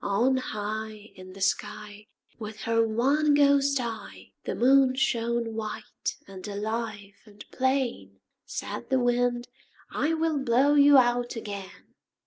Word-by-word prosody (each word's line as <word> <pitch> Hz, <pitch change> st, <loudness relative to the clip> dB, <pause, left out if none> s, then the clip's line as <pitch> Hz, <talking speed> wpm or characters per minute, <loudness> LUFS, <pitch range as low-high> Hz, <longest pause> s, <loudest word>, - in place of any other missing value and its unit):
On 235 Hz, +7 st, +2 dB
high 215 Hz, -2 st, -5 dB
In 185 Hz, 0 st, -12 dB
the 195 Hz, -, -12 dB
sky 205 Hz, +2 st, -2 dB, 0.3 s
With 215 Hz, -2 st, -7 dB
her 230 Hz, +1 st, +2 dB
one 275 Hz, +7 st, +2 dB
ghost 280 Hz, -1 st, +4 dB
eye, 230 Hz, -2 st, -7 dB
The -, -, -2 dB
Moon 265 Hz, +1 st, +4 dB
shone 235 Hz, -3 st, 0 dB
white 220 Hz, -1 st, -5 dB
and 195 Hz, 0 st, -9 dB
alive 210 Hz, 0 st, -4 dB
and 210 Hz, 0 st, -13 dB
plain. 255 Hz, -, -1 dB, 0.2 s
Said 115 Hz, -, -6 dB
the 265 Hz, -, +3 dB
Wind 245 Hz, 0 st, +1 dB, 0.4 s
"I 320 Hz, +2 st, 0 dB
will 320 Hz, -2 st, 0 dB
blow 270 Hz, +3 st, +3 dB
you 285 Hz, -1 st, +7 dB
out 245 Hz, -1 st, +2 dB
again." 200 Hz, -4 st, -8 dB
235 Hz, 130 wpm, -27 LUFS, 210-265 Hz, 0.4 s, you